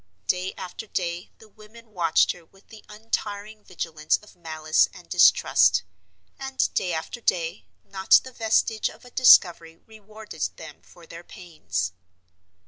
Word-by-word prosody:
Day 180 Hz, -, -2 dB
after 185 Hz, +4 st, -8 dB
day 175 Hz, -2 st, -4 dB
the 220 Hz, -, -17 dB
women 215 Hz, +2 st, -17 dB
watched 170 Hz, -5 st, +2 dB
her 175 Hz, -, -12 dB
with 195 Hz, +4 st, -26 dB
the 220 Hz, -1 st, -14 dB
untiring 210 Hz, -1 st, -5 dB
vigilance 160 Hz, -4 st, -2 dB
of 210 Hz, -, -19 dB
malice 155 Hz, -2 st, 0 dB
and -, -, -14 dB
distrust, 90 Hz, -1 st, +4 dB, 0.6 s
and 270 Hz, -1 st, -2 dB
day 180 Hz, -, -1 dB
after 165 Hz, +9 st, -5 dB
day 165 Hz, -, -2 dB, 0.2 s
not 190 Hz, -1 st, +4 dB
the 260 Hz, -, -10 dB
vestige 220 Hz, -2 st, 0 dB
of -, -, -16 dB
a 250 Hz, -, -15 dB
discovery 175 Hz, -10 st, +5 dB
rewarded 215 Hz, -4 st, -13 dB, 0.2 s
them 160 Hz, -1 st, -12 dB
for 170 Hz, -, -18 dB
their 170 Hz, +1 st, -11 dB
pains. 155 Hz, -, -5 dB
185 Hz, 140 wpm, -24 LUFS, 165-215 Hz, 0.6 s, discovery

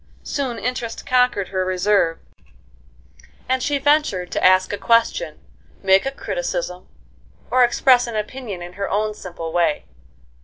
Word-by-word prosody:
Soon 265 Hz, -5 st, -3 dB
interest 245 Hz, -1 st, -4 dB
conquered 250 Hz, -6 st, +2 dB
her 185 Hz, -1 st, -1 dB
reserve, 185 Hz, -2 st, +1 dB, 1.3 s
and 260 Hz, 0 st, 0 dB
she 285 Hz, +2 st, 0 dB
ventured 280 Hz, -11 st, +1 dB
to -, -, -2 dB
ask 185 Hz, +1 st, +4 dB
a -, -, -2 dB
question, 230 Hz, +1 st, +1 dB, 0.5 s
make 190 Hz, +5 st, +4 dB
a -, -, -1 dB
criticism, -, -, -4 dB, 0.6 s
or 255 Hz, 0 st, +5 dB
express 245 Hz, 0 st, +4 dB
an 235 Hz, -, -5 dB
opinion 210 Hz, -3 st, -5 dB
in 175 Hz, 0 st, -9 dB
her 200 Hz, +1 st, -4 dB
own 215 Hz, +1 st, 0 dB
simple 170 Hz, -5 st, -7 dB
way. 170 Hz, -3 st, +1 dB
215 Hz, 140 wpm, -21 LUFS, 185-255 Hz, 1.3 s, or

